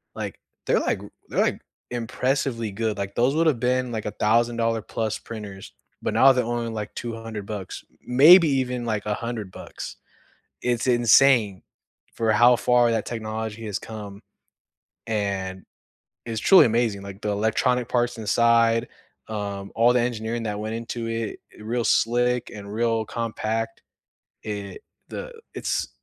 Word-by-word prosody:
like -, -, -5 dB, 0.3 s
they're, -, -, +3 dB
like -, -, 0 dB, 0.3 s
they're, -, -, -1 dB
like, -, -, 0 dB, 0.3 s
impressively 120 Hz, -1 st, -1 dB
good, 110 Hz, +1 st, -2 dB
like, 100 Hz, 0 st, -4 dB
those 130 Hz, +5 st, +2 dB
would've 160 Hz, -6 st, +2 dB
been, 125 Hz, 0 st, +1 dB
like, 110 Hz, -2 st, -4 dB
a 105 Hz, -, -2 dB
thousand-dollar-plus 115 Hz, 0 st, 0 dB
printers, 105 Hz, -4 st, -9 dB, 0.3 s
but -, -, -2 dB
now 135 Hz, -, +7 dB
they're 125 Hz, -1 st, +1 dB
only, 120 Hz, 0 st, -2 dB
like, 105 Hz, -1 st, -5 dB
200 115 Hz, -3 st, -6 dB
bucks, 100 Hz, -3 st, -6 dB
m 125 Hz, -, -7 dB
maybe 165 Hz, +3 st, +9 dB
even, 125 Hz, -2 st, 0 dB
like, 110 Hz, -3 st, -2 dB
100 105 Hz, -1 st, -3 dB
bucks. -, -, -8 dB, 0.7 s
It's 120 Hz, -1 st, 0 dB
insane 120 Hz, -4 st, +4 dB, 0.5 s
for 115 Hz, -1 st, +1 dB
how 120 Hz, +3 st, +6 dB
far 120 Hz, 0 st, +3 dB
that 110 Hz, -, -1 dB
technology 110 Hz, -1 st, -5 dB
has 105 Hz, -3 st, -2 dB
come, 105 Hz, -3 st, -9 dB, 0.9 s
and 100 Hz, -4 st, -2 dB, 0.6 s
it's 115 Hz, -2 st, -3 dB
truly 190 Hz, -, +7 dB
amazing, 115 Hz, -3 st, 0 dB
like, 100 Hz, 0 st, -9 dB
the -, -, -2 dB
electronic 110 Hz, +4 st, +1 dB
parts 120 Hz, -1 st, 0 dB
inside, 115 Hz, +2 st, +3 dB, 0.4 s
um, 100 Hz, -2 st, -4 dB
all 120 Hz, +2 st, +5 dB
the 125 Hz, -, +4 dB
engineering 115 Hz, -1 st, -2 dB
that 105 Hz, -2 st, -3 dB
went 110 Hz, +1 st, -4 dB
into 115 Hz, 0 st, -4 dB
it, 115 Hz, -1 st, -3 dB, 0.2 s
i -, -, -11 dB
real 115 Hz, +2 st, -1 dB
slick 120 Hz, +2 st, +2 dB
and 100 Hz, -1 st, -9 dB
real 115 Hz, 0 st, +1 dB
compact. 115 Hz, 0 st, -3 dB, 0.6 s
It 100 Hz, -2 st, -6 dB, 0.3 s
the -, -, -6 dB, 0.2 s
it's -, -, -2 dB
115 Hz, 145 wpm, -24 LUFS, 105-120 Hz, 0.9 s, maybe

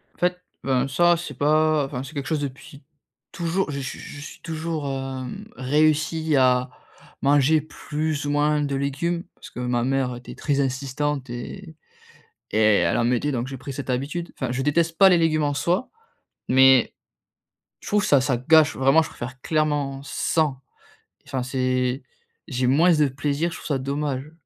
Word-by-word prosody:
En -, -, -27 dB
fait, 180 Hz, 0 st, 0 dB, 0.2 s
ben, 135 Hz, 0 st, +1 dB
ça 175 Hz, +5 st, +3 dB
c'est 170 Hz, -, -6 dB
pas 155 Hz, 0 st, +3 dB
enfin 130 Hz, -1 st, -5 dB
c'est 135 Hz, -, -10 dB
quelque 140 Hz, -3 st, -4 dB
chose 155 Hz, -2 st, 0 dB
depuis 140 Hz, +1 st, -7 dB, 0.5 s
toujou 175 Hz, +2 st, -1 dB
je 140 Hz, -1 st, -3 dB
suis 135 Hz, 0 st, -5 dB
je 145 Hz, -, -9 dB
suis 145 Hz, -, -10 dB
toujours, 160 Hz, -2 st, -4 dB
hem, 135 Hz, -2 st, -5 dB
réussi 155 Hz, +3 st, +1 dB
à 125 Hz, -1 st, +3 dB, 0.5 s
manger 145 Hz, +2 st, +4 dB
plus 155 Hz, -1 st, -4 dB
ou 145 Hz, -, -1 dB
moins 150 Hz, 0 st, +2 dB
de 140 Hz, -1 st, -1 dB
légumes 150 Hz, +6 st, -2 dB
parce -, -, -12 dB
que -, -, -9 dB
ma 125 Hz, -1 st, 0 dB
mère 130 Hz, -1 st, 0 dB
était 120 Hz, -, -10 dB
très 140 Hz, -2 st, -1 dB
insistante 135 Hz, +1 st, -2 dB
et 160 Hz, +8 st, -8 dB, 0.8 s
et 105 Hz, -, -1 dB
elle 105 Hz, -6 st, +3 dB
en -, -, +2 dB
mettait 125 Hz, +4 st, +1 dB
donc 120 Hz, -1 st, -2 dB
j'ai 135 Hz, 0 st, -6 dB
pris 135 Hz, +2 st, -7 dB
cette 135 Hz, -1 st, -4 dB
habitude. 145 Hz, +7 st, -3 dB
Enfin, 130 Hz, -3 st, -2 dB
je 130 Hz, +2 st, -2 dB
déteste 165 Hz, +3 st, +1 dB
pas 195 Hz, -1 st, +8 dB
les 175 Hz, -, +4 dB
légumes 155 Hz, -2 st, +2 dB
en 145 Hz, -, +1 dB
soi, 175 Hz, -, 0 dB, 0.6 s
mais 130 Hz, -1 st, +5 dB, 0.9 s
je -, -, -12 dB
trouve 205 Hz, -1 st, +2 dB
ça 140 Hz, -3 st, +4 dB
ça 125 Hz, -2 st, 0 dB
gâche. 155 Hz, +3 st, +4 dB
Vraiment 135 Hz, +4 st, +5 dB
je 160 Hz, -, -4 dB
préfère 125 Hz, +1 st, -8 dB
clairement 145 Hz, -3 st, 0 dB
sans. 145 Hz, -1 st, -1 dB, 0.7 s
Enfin 130 Hz, -3 st, -2 dB
c'est 130 Hz, 0 st, -1 dB, 0.5 s
j'ai 130 Hz, -4 st, -1 dB
moins 155 Hz, +8 st, +4 dB
de 150 Hz, -2 st, +3 dB
plaisir, 140 Hz, +5 st, -1 dB
je -, -, -7 dB
trouve -, -, -9 dB
ça 145 Hz, -3 st, 0 dB
dommage. 140 Hz, +1 st, -3 dB
140 Hz, 175 wpm, -23 LUFS, 130-155 Hz, 0.9 s, pas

